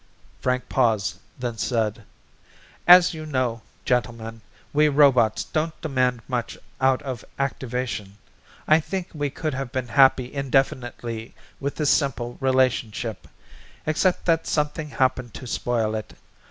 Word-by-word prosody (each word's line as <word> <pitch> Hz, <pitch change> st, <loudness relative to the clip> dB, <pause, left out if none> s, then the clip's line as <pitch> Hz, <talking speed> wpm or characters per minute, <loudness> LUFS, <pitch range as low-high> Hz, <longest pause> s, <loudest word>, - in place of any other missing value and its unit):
Frank 125 Hz, 0 st, -1 dB
paused, 110 Hz, -6 st, +1 dB, 0.2 s
then 120 Hz, -3 st, -4 dB
said, 110 Hz, -3 st, -1 dB, 0.8 s
"As 180 Hz, 0 st, +8 dB
you 155 Hz, -1 st, -6 dB
know, 130 Hz, -6 st, -1 dB, 0.2 s
gentlemen, 115 Hz, -2 st, -1 dB, 0.3 s
we 150 Hz, +1 st, +5 dB
robots 135 Hz, -7 st, +4 dB
don't 155 Hz, 0 st, -2 dB
demand 125 Hz, -6 st, 0 dB
much 125 Hz, -3 st, -3 dB, 0.2 s
out 130 Hz, -1 st, +3 dB
of 130 Hz, -5 st, -5 dB
activation. 125 Hz, -6 st, -3 dB, 0.5 s
I 155 Hz, +1 st, +6 dB
think 185 Hz, +3 st, -4 dB
we 145 Hz, -2 st, -2 dB
could 155 Hz, +2 st, -3 dB
have 135 Hz, -2 st, -4 dB
been 130 Hz, -2 st, -3 dB
happy 130 Hz, 0 st, +4 dB
indefinitely 125 Hz, -4 st, -1 dB, 0.2 s
with 140 Hz, +1 st, -3 dB
this 150 Hz, -2 st, +2 dB
simple 120 Hz, -4 st, 0 dB
relationship, 125 Hz, -5 st, 0 dB, 0.6 s
except 170 Hz, +4 st, +1 dB
that 165 Hz, -2 st, +2 dB
something 150 Hz, 0 st, -1 dB
happened 130 Hz, -3 st, 0 dB
to -, -, -8 dB
spoil 115 Hz, -2 st, -1 dB
it. 110 Hz, -1 st, -5 dB
130 Hz, 125 wpm, -24 LUFS, 120-145 Hz, 0.8 s, As